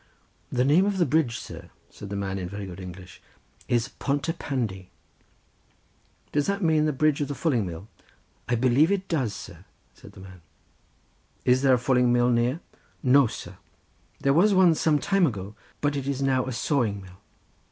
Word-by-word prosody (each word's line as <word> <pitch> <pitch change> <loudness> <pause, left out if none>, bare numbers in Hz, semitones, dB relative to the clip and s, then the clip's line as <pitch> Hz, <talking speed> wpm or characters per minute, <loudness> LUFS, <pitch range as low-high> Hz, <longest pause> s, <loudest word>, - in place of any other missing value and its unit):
"The 125 0 +1
name 165 +8 +4
of 200 -1 -1
the 175 - +3
bridge, 140 -4 +1
sir," - - -10 0.2
said 100 - -10
the 100 - -4
man, 100 -1 -3
in 90 -1 -5
very 100 +1 -6
good 90 -1 -9
English, 90 0 -10 0.5
"is 120 0 +1
Pont 140 +2 -2
y 165 - 0
Pandy." 105 -9 -3 1.4
"Does 145 -1 0
not 200 +1 -1
that - - +1
mean 155 -1 +3
the 155 - +1
bridge 150 +1 +1
of 145 - -1
the 145 - -4
fulling 125 - 0
mill?" 85 +4 -8 0.6
"I 120 - +2
believe 130 - +3
it 195 -1 -1
does, 130 - -1
sir," - - -10 0.3
said - - -15
the - - -14
man. 95 -2 -13 1.0
"Is 125 +1 +4
there 135 -2 +5
a - - +1
fulling 125 0 +2
mill 120 0 +3
near?" 120 +7 +1 0.4
"No, 135 0 +5
sir, 95 -3 -9 0.6
there 140 - +2
was 195 +6 +4
one 185 -3 +6
some 155 -1 +2
time 195 +2 +2
ago, 100 -5 -5 0.3
but 145 0 0
it 140 -1 -3
is 140 -1 -2
now 130 -1 +1
a - - -3
sawing 115 -5 0
mill." 90 -1 -15
130 Hz, 190 wpm, -26 LUFS, 105-150 Hz, 1.4 s, one